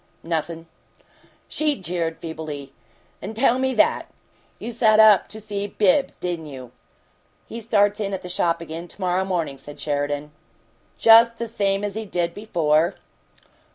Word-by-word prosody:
"Nothin'." 165 0 -3 0.8
She 305 -1 0
jeered 170 -5 -3
feebly. 155 -4 -7 0.5
"N' 210 +4 -6
tell 245 +1 +3
ME 260 -1 0
that! 210 - +2 0.5
You 240 - -6
sat 220 -2 +4
up 215 -3 +7
to 220 - -8
see 205 -1 -4
Bibbs, 215 +8 +2
didn't 170 -3 -4
you?" 130 -4 -10 0.7
"He 230 - -8
starts 205 -2 +2
in 200 -2 -2
at 190 - -4
the - - -6
shop 170 -1 0
again 165 +1 -7
to - - -15
morrow 185 0 +1
morning," 170 -8 -2
said 145 +2 -11
Sheridan. 145 0 -2 0.7
"Just 230 +1 +7
the 235 - -4
same 200 -3 -1
as 205 -1 -2
he 220 +1 -5
did 170 -2 -1
before?" 170 -6 +1
185 Hz, 155 wpm, -23 LUFS, 165-220 Hz, 0.8 s, up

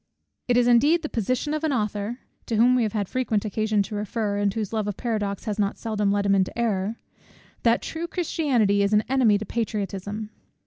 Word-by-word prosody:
It 245 -1 +3
is 245 0 +4
indeed 290 +8 +4
the 305 - -3
position 255 +6 -1
of 310 +1 -2
an 315 - +1
author, 215 0 -2 0.3
to 230 - -1
whom 240 +3 +5
we 250 - +3
have 215 -3 -1
had 205 -3 -1
frequent 230 -4 -1
occasion 215 0 +1
to 210 - -8
refer, 210 0 -2
and 205 -1 +2
whose 215 0 -4
love 215 -2 -1
of 205 - -3
paradox 210 -5 -2
has 215 -2 -3
not 200 -1 0
seldom 210 -3 -1
led 200 0 +1
him 200 - +3
into 190 +2 +1
error, 215 -2 0 0.7
that 230 0 +2
true 330 +1 -4
Christianity 270 - +1
is 200 +1 +1
an 210 +1 +4
enemy 245 -6 +4
to 215 - -5
patriotism. 210 -1 -3
215 Hz, 210 wpm, -25 LUFS, 205-245 Hz, 0.7 s, whom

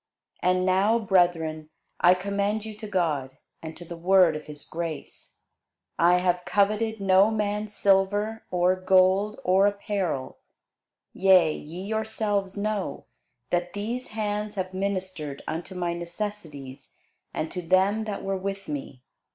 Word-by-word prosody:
And 185 0 +2
now, 195 +5 +3
brethren, 175 -7 +1 0.3
I 180 +1 +6
commend 200 +3 -1
you 220 - -6
to 215 +1 -8
God, 150 -9 -1 0.2
and 160 0 -8
to 175 - -9
the 170 - -7
word 180 -1 +4
of 155 - -7
his 150 -1 -9
grace. 165 -2 -6 0.6
I 175 +2 +5
have 180 0 +1
coveted 215 +3 +1
no 195 +1 +5
man's 210 -1 -2
silver, 205 +3 +2
or 180 +1 +2
gold, 190 +4 +3
or 195 -1 +4
apparel. 200 -8 -2 0.7
Yea, 185 -5 +5
ye 170 +5 -8
yourselves 210 -2 -2
know, 200 -7 -2 0.5
that 175 0 0
these 230 +5 -3
hands 210 -1 -3
have 185 -1 -3
ministered 185 -7 -3
unto 170 +4 -5
my 175 -1 -1
necessities, 170 -6 -6 0.4
and 160 - -3
to 180 - -3
them 190 +5 +2
that 205 -2 -4
were 195 0 -1
with 195 +1 -5
me. 135 -3 -6
190 Hz, 135 wpm, -26 LUFS, 175-205 Hz, 0.7 s, I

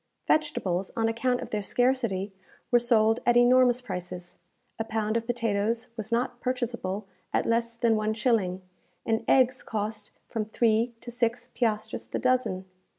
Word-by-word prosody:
Vegetables, 195 - +1
on 225 -1 +1
account 245 +2 0
of - - -7
their 210 - -1
scarcity, 230 -4 0 0.4
were 240 - +6
sold 225 -1 +3
at 240 0 +4
enormous 250 0 +5
prices. 180 -5 -7 0.4
A - - +1
pound 220 -1 -1
of 230 0 -1
potatoes 230 -1 0
was 220 -2 -5
not 240 +1 -1
purchaseable 235 -6 -2 0.3
at - - +1
less 230 0 0
than 230 -1 +2
one 215 0 0
shilling, 205 -6 +1 0.4
and 225 0 0
eggs 260 -1 +4
cost 210 -1 -4 0.2
from 220 -2 -2
three 230 +2 +1
to 240 - -7
six 240 +1 -1
piastres 215 -3 -1
the - - -3
dozen. 250 -8 +1
230 Hz, 150 wpm, -27 LUFS, 215-245 Hz, 0.4 s, were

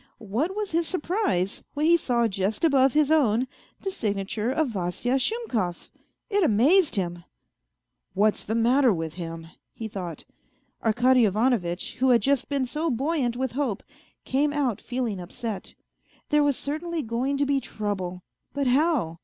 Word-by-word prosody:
What 240 - -2
was 420 -2 -3
his 330 0 +1
surprise 350 - -1
when 295 +1 0
he 340 +1 +6
saw 240 -7 +1
just 195 - -2
above 270 -4 +4
his 300 0 +3
own 255 -5 +3 0.3
the 390 - -2
signa 205 - -2
ture 215 +3 -2
of 285 +2 +1
Vasya 215 +6 -1
Shumkov 245 - -2 0.4
1 410 -2 +2
It - - +3
amazed 295 - +4
him. 175 -3 -2 0.4
" - - -55
What's 210 +2 +2
the 220 - -2
matter 245 +3 +4
with 165 -4 -3
him? 165 -2 -6 0.2
" - - -57
he 225 - -5
thought. 180 -6 -6 0.6
Arkady 245 +3 +4
Ivanovitch, 205 -4 0
who 260 +1 +3
had 240 -2 +4
just 275 -2 +1
been 280 -2 0
so 310 +6 -2
buoyant 265 -2 0
with 260 -1 -1
hope, 255 -6 -2 0.4
came 285 +3 +1
out 275 -8 -1
feeling 245 -6 -3
upset. 200 +3 -5 0.5
There 300 0 +4
was 285 -2 +2
cer 290 +2 -3
tainly 340 -3 -3
going 250 +5 -1
to 285 - +2
be 280 0 +2
trouble, 190 -7 -4 0.3
but 280 -1 0
how 255 - +2
245 Hz, 170 wpm, -26 LUFS, 200-290 Hz, 0.6 s, he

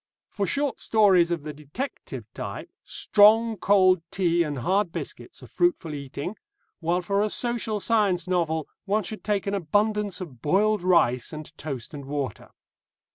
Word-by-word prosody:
For 200 -2 -2
short 285 -1 -1
stories 195 -6 +4
of 170 -4 -2
the 150 0 -6
detective 150 - -6
type, - - -6
strong 220 +2 +4
cold 185 -2 +4
tea 175 -3 +1
and 150 -4 -1
hard 185 - +1
biscuits - - -7
are - - -10
fruitful 315 - 0
eating, 140 +7 -6 0.4
while 175 +2 0
for 200 +3 +1
a 215 - +1
social 230 -2 -1
science 200 -5 +1
novel 160 -4 0 0.2
one 210 +2 +1
should 215 +4 -7
take 205 -2 0
an 200 - -2
abundance 205 +1 0
of 140 -11 -9
boiled 205 +6 +2
rice 170 -9 +2
and 155 0 -9
toast 140 -6 -6
and 140 -2 -7
water. 140 -5 -4
185 Hz, 155 wpm, -25 LUFS, 155-210 Hz, 0.4 s, stories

